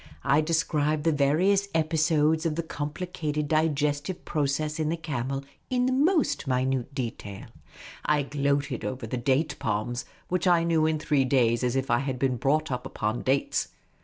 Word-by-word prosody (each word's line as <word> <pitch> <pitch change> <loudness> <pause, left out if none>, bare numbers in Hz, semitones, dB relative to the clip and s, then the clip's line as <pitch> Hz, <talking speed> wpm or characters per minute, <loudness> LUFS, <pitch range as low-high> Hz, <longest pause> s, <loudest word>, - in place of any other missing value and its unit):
I 145 +3 +4
described 155 -2 0
the 165 - +3
various 170 +8 +2
episodes 155 0 +2
of 155 - -2
the 170 - -2
compli 150 +2 -4
cated 150 -4 -3
digestive 150 +1 0
process 150 +1 -1
in 155 -1 0
the 165 - -1
camel 140 -4 -3 0.3
in 250 -1 +1
the 260 - +1
minutest 300 - +2 0.5
detail. 115 -6 -5 0.6
I 150 -1 +2
gloated 140 -2 -1
over 130 -2 -4
the 120 +3 -3
date 140 +5 +1
palms, 110 +3 -2 0.2
which 180 0 0
I 175 -2 +4
knew 165 -2 +2
in 160 0 +1
three 150 -2 +1
days 125 -3 +2
as 125 0 0
if 135 0 -1
I 120 - +4
had 135 -2 -2
been 130 -1 0
brought 150 +4 +1
up 125 -1 -3
upon 110 +3 -2
dates. 135 +1 0
150 Hz, 165 wpm, -27 LUFS, 135-160 Hz, 0.6 s, I